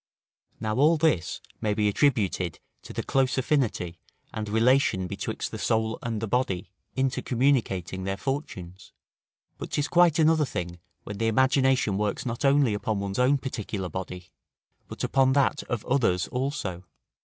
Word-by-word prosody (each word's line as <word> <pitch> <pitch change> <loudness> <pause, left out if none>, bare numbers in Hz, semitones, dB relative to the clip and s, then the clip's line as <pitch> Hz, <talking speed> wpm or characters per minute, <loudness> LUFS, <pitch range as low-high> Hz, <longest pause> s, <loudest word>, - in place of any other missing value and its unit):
Now 110 +1 -2
all 155 +4 +5
this 155 - +1 0.2
may 105 -1 0
be 105 -1 +2
attributed 100 - +1 0.2
to - - -11
the - - -3
close 135 -1 +1
affinity 120 - 0 0.3
and 105 -1 -4
relation 115 -3 +3
betwixt - - -4
the - - -6
soul 110 0 0
and 115 -2 -3
the 110 - -3
body 100 -6 -1 0.2
intercommunicating 125 -8 0
their 95 +1 -2
fortunes; 95 - -5 0.7
but - - -6
'tis 145 0 -1
quite 175 -3 +4
another 160 -1 +4
thing 90 -9 -4 0.2
when 105 -1 -7
the 115 - +1
imagination 130 -3 +2
works 105 +4 -1
not 120 +1 -3
only 140 -4 +4
upon 105 0 -2
one's 100 +1 -3
own 130 +3 +4
particular 105 -8 -4
body, 90 +1 -7 0.6
but - - -7
upon 130 -1 +3
that 140 +1 +2
of 120 -3 -3
others 110 -10 +1
also. 125 -9 -3
115 Hz, 150 wpm, -26 LUFS, 95-135 Hz, 0.7 s, all